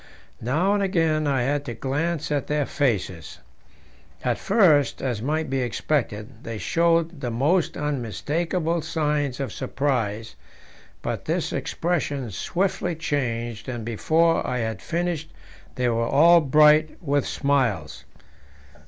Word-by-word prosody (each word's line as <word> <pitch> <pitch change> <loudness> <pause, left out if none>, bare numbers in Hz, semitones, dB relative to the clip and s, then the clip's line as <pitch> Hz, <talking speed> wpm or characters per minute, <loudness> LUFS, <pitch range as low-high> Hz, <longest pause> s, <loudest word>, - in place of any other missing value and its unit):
Now 160 - +1
and 205 - +1
again 165 -5 +1
I 135 -3 +1
had 145 +2 0
to 120 -4 -5
glance 150 +6 -2
at 145 -3 -1
their 150 -1 0
faces. 100 - -2 0.9
At 125 -2 0
first, 155 - +3
as 120 -5 -2
might 155 +5 -1
be 135 0 -1
expected, 120 -3 -2
they 115 -1 -5
showed 165 +2 +1
the 125 - -2
most 150 +10 +1
unmistakable 155 - -1
signs 150 -4 -1
of 135 -6 -3
surprise; 115 -6 -2 0.7
but - - -3
this - - -1
expression 145 -8 -2
swiftly 175 - -1
changed, 120 -7 -3
and 120 -3 -5
before 160 +9 +2
I 125 - -1
had 110 -4 -3
finished 170 -2 -2 0.4
they 125 -1 0
were 115 -1 +1
all 170 +6 +6
bright 150 +2 +5
with 145 -4 0
smiles. 135 -8 0
145 Hz, 125 wpm, -24 LUFS, 120-160 Hz, 0.9 s, all